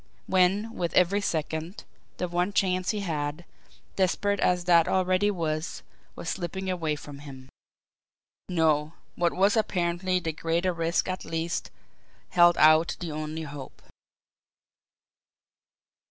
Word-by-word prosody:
When, 190 +4 +2
with 170 -2 -2
every 185 +3 +4
second, 160 0 -3 0.3
the 180 - -2
one 175 +3 -1
chance 185 -2 +1
he 210 -2 -1
had, 155 -2 -3 0.5
desperate 200 +1 +1
as 180 -1 +2
that 170 -2 +5
already 185 +2 +2
was, 160 -4 -3 0.3
was - - -8
slipping 190 +2 -3
away 160 -4 -1
from 145 -1 -10
him. 135 -2 -11 1.0
No; 155 -3 +2 0.2
what 175 -1 +1
was 200 +3 +3
apparently 185 -3 0
the 165 -2 -3
greater 170 +3 0
risk 165 0 0
at 185 0 -3
least 165 +1 -3 0.6
held 175 -1 +5
out 155 +2 +5
the 170 -3 -5
only 155 +1 -4
hope. 145 -3 -9
175 Hz, 125 wpm, -27 LUFS, 160-185 Hz, 1.0 s, that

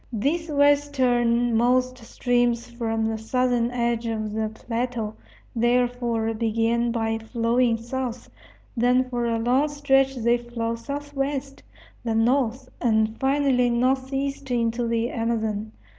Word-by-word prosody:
These 300 +9 -1
westernmost 255 -4 +2
streams 240 0 0
from 225 -2 -2
the 220 0 -2
southern 245 +1 +1
edge 235 -1 -1
of 215 -2 -3
the 220 0 -1
plateau, 230 0 -3 0.4
therefore, 240 -1 +1
begin 230 +1 0
by 225 -1 -1
flowing 230 +1 +1
south; 245 +1 -5 0.5
then 250 +2 +3
for 240 -1 -2
a 230 -1 0
long 250 +6 +2
stretch 270 -2 +2
they 240 0 +2
flow 235 -1 -3
southwest; 280 +2 -4 0.4
then 225 -1 +1
north, 255 0 0
and 220 -2 +2
finally 270 -2 +2
northeast 265 +3 -1
into 235 0 0
the 230 +1 0
Amazon. 220 -2 -2
240 Hz, 115 wpm, -24 LUFS, 230-260 Hz, 0.5 s, then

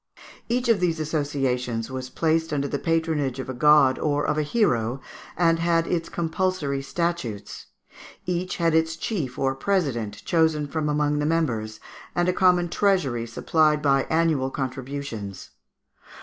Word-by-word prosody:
Each 245 +1 0
of 230 -4 +4
these 170 -3 0
associations 135 -6 -1
was 130 -1 -5
placed 160 +3 0
under 140 -1 0
the 140 - -3
patronage 160 -5 0
of 130 - -6
a - - -3
god 140 0 +5
or 145 -1 0
of - - +1
a 155 - +1
hero, 135 - +1 0.4
and 165 -1 +3
had 165 0 +2
its 170 -1 -2
compulsory 165 -4 -1
statutes; 170 - -3 0.6
each 180 +1 -2
had 165 -2 +2
its 160 0 +2
chief 160 - -3
or 135 -1 +1
president 135 - -2
chosen 160 -3 +2
from 150 +1 -2
among 150 0 +1
the 150 - 0
members, 115 -10 -1 0.4
and 175 0 +1
a 180 - +2
common 180 -1 +3
treasury 165 - +1
supplied 150 +5 +1
by 135 -2 +3
annual 160 -5 +2
contributions. 130 -6 -5
150 Hz, 150 wpm, -24 LUFS, 130-165 Hz, 0.6 s, god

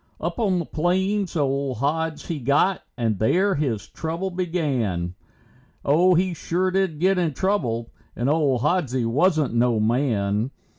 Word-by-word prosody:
Up - - -3
on 195 -5 +2
the 170 - -2
plains 190 +5 0
old 140 -3 0
Hods 155 +4 -1
he 165 -3 -3
got 140 +9 +2 0.2
and 110 -5 0
there 190 - +2
his 125 - -2
trouble 170 +4 -4
began. 135 - -1 0.7
Oh, 175 +6 +4
he 180 +1 +1
sure 180 +3 -1
did 190 -5 0
get 190 +2 +3
in 160 -5 0
trouble, 120 - -1 0.2
and 120 - -1
old 140 -5 +2
Hodsie 140 -5 0
wasn't 150 +3 +2
no 120 -1 +2
man. 110 -2 +1
150 Hz, 145 wpm, -23 LUFS, 120-180 Hz, 0.7 s, Oh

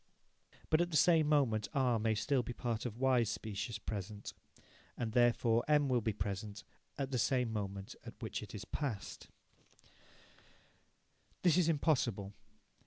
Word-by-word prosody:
But 155 +1 +5
at 175 - 0
the 155 - +1
same 160 -3 +5
moment 120 -8 +2
R 125 -4 +2
may 110 0 +1
still 135 +5 +1
be 120 +1 -6
part 120 0 -2
of 115 -1 -8
Y's 125 -4 +3
specious 110 +2 -4
present. 105 -1 -6 0.6
And, 115 -2 -2
therefore, 120 -1 +3
M 145 -2 +3
will 125 -2 +2
be 110 - 0
present, 100 +1 -4 0.3
at 135 -1 -3
the 125 - 0
same 125 -2 +1
moment 100 -2 -4
at - - -9
which - - -4
it - - -9
is 105 0 -6
past. 120 -5 -4 2.2
This 175 -4 +5
is 175 -2 +3
impossible. 125 -11 +1
120 Hz, 150 wpm, -35 LUFS, 105-140 Hz, 2.2 s, But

